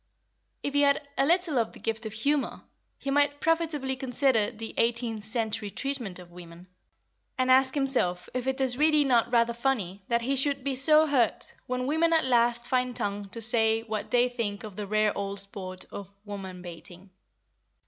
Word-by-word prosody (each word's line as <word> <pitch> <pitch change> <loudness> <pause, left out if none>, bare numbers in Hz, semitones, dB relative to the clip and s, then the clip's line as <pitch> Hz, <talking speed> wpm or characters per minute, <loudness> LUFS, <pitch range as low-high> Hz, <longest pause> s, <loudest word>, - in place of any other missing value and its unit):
If 285 - -2
he 285 - +3
had 280 0 +2
a 270 - +2
little 340 -5 +2
of 225 - -2
the - - -13
gift 225 0 -3
of 215 - -7
humour, 280 +6 -1 0.4
he 275 - -4
might 290 0 +2
profitably 320 -5 0
consider 255 -3 +1
the 225 +1 -7
eighteenth 230 -2 0
century 220 -1 -2
treatment 245 -6 -3
of 180 -1 -13
women, 175 0 -12 0.7
and 255 0 +2
ask 260 +1 +4
himself 250 -11 +2
if 255 0 -3
it 265 0 -1
is 260 -1 +2
really 305 -1 +4
not 245 -5 +2
rather 235 -1 +3
funny 230 -7 -2
that 235 0 0
he 270 +3 0
should 275 0 +1
be 275 -1 -1
so 305 +4 +6
hurt 265 -7 +1
when 250 0 -2
women 320 +4 +2
at 320 -3 +3
last 240 -1 +2
find 250 -1 -1
tongue 205 -3 -3
to 230 +4 -9
say 225 -1 +2
what 215 -2 -5
they 245 0 +3
think 230 -5 -4
of 210 -3 -9
the 210 -1 -5
rare 215 0 +1
old 200 0 -4
sport 185 -2 -7
of 200 -2 -8 0.2
woman 190 -3 -8
baiting. 175 +2 -11
240 Hz, 185 wpm, -27 LUFS, 210-270 Hz, 0.7 s, so